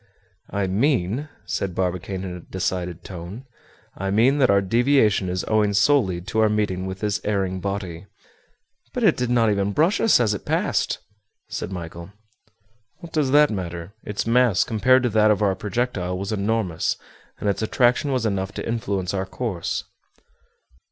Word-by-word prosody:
"I 100 -1 -1
mean," 115 +5 0 0.2
said 95 -3 -3
Barbicane 95 +1 -2
in 90 -2 -5
a - - -7
decided 90 -1 -3
tone, 95 +7 -8 0.5
"I 95 +1 -3
mean 120 +8 +3
that 130 - +4
our 100 0 +5
deviation 110 -2 +2
is 90 0 -2
owing 105 -2 +2
solely 100 -7 +3
to 105 +4 -3
our 110 -1 +4
meeting 105 -3 -1
with 95 0 -6
this 105 0 -1
erring 95 -3 -1
body." 95 -2 -4 0.9
"But - - -1
it - - +5
did 125 -1 -1
not 115 -3 +3
even 100 0 0
brush 170 - +2
us 225 - +5
as 110 -4 +2
it 100 - -5
passed," - - 0 0.5
said - - -4
Michel. 85 0 -7 0.9
"What 170 -2 -11
does 150 -4 +1
that 145 0 +5
matter? 85 -2 -5
Its 105 -1 -3
mass, 115 -4 +4
compared 130 +4 +3
to 125 - +2
that 110 0 +4
of 105 0 +2
our 100 -2 +3
projectile, 95 -2 -2
was 100 +2 -4
enormous, 105 -4 0 0.4
and - - -4
its 100 - 0
attraction 120 +5 +2
was 130 -3 0
enough 95 -2 -1
to - - -5
influence 100 -5 -2
our 95 -1 -2
course." 100 -9 -3
100 Hz, 165 wpm, -23 LUFS, 95-115 Hz, 0.9 s, our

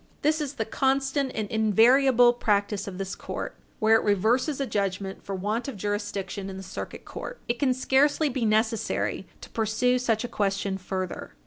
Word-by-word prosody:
This 310 +2 +2
is 285 -1 -4
the 220 - -2
constant 270 +2 0
and 215 -2 -2
invariable 240 +3 +5
practice 205 -4 0
of 185 -2 -6
this 195 0 -4
court - - -5 0.2
where 220 +1 +5
it - - -2
reverses 230 - +2
a 275 - 0
judgment 195 -3 -2
for 195 - -4
want 210 +7 -2
of 265 -7 -5
jurisdiction 200 -1 -3
in 190 - -7
the 190 - -7
Circuit 190 - -7
Court. - - -7
It 235 0 -1
can 275 -3 +3
scarcely 285 +4 +3
be 260 -3 -2
necessary 220 +1 0
to - - -10
pursue 230 +3 +1
such 225 -3 0
a - - -2
question 195 -2 -1
further. 185 0 -5
220 Hz, 180 wpm, -26 LUFS, 200-260 Hz, 0.2 s, invariable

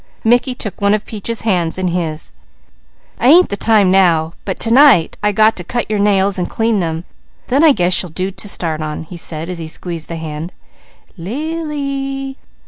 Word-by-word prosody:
Mickey 245 +3 +2
took 210 -3 -6
one 200 +1 +3
of 215 - -5
Peaches' 225 +1 -4
hands 180 -7 0
in 185 -1 -1
his. 165 -3 -3 0.9
"I 240 - +2
ain't 345 +6 +7
the 200 - -2
time 205 -3 +3
now, 170 -4 +3
but 190 - -4
to 230 - +1
night 260 - +5
I 210 - +2
got 215 +2 +3
to 180 - -5
cut 235 +4 -3
your 210 - 0
nails 200 -1 +2
and 180 - -2
clean 225 -2 0
them, 165 -1 -2 0.5
then 275 +5 +3
I 320 - +7
guess 180 -7 +2
you'll 180 - -7
do 185 +4 -3
to 205 +2 -3
start 160 -4 -2
on," 155 0 -4
he 170 +3 -11
said 160 -1 -3
as 180 -1 -5
he 160 - -6
squeezed 165 0 -5
the 170 - -4
hand. 160 +1 -6 0.6
"Lily! 275 - -4
195 Hz, 195 wpm, -16 LUFS, 170-235 Hz, 0.9 s, ain't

